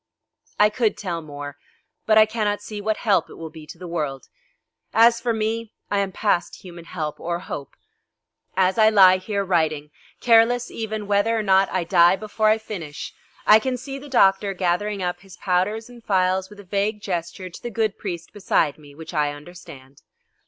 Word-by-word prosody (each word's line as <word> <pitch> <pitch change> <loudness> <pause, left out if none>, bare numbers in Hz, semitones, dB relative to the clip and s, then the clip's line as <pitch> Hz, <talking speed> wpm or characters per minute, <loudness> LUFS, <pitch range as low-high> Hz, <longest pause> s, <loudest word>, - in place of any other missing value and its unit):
I 210 0 +5
could 220 -1 0
tell 175 -4 -4
more, 145 -2 -8 0.5
but 215 -1 +5
I 215 - +8
cannot 215 -2 -1
see 210 -1 -6
what 215 +1 -1
help 195 -7 +1
it - - -11
will 160 -1 -8
be 155 -1 -12
to - - -10
the 180 - -9
world. 150 -6 -4 0.7
As 230 +1 +5
for 240 0 0
me, 220 0 -2 0.2
I 205 - +2
am 195 -1 -1
past 185 -3 -1
human 170 -2 -11
help 155 -4 -5
or 170 0 -2
hope. 145 -5 -7 0.8
As 190 +3 +2
I 215 0 +7
lie 190 -3 +7
here, 200 +1 -3
writing, 155 -5 0 0.3
careless 240 +1 +4
even 220 -2 -4
whether 205 +3 +2
or 220 - -1
not 195 -1 +4
I 185 -2 0
die 170 0 +5
before 215 +1 -1
I 215 - +4
finish, 180 -9 -7 0.3
I 215 - +8
can 255 +2 -2
see 270 +2 -7
the 290 +1 -11
doctor 195 -5 +3
gathering 190 +2 -1
up 180 0 -2
his 195 -1 -15
powders 205 +4 0
and 240 -2 -14
phials 190 -1 +1
with 210 -1 -14
a - - -10
vague 205 +3 -1
gesture 180 -1 -4
to - - -11
the 240 - -5
good 220 -2 -1
priest 175 -4 -6
beside 165 -7 0
me, 145 -1 -15
which 160 +1 -10
I 150 -1 +1
understand. 145 -3 -13
195 Hz, 190 wpm, -23 LUFS, 170-215 Hz, 0.8 s, I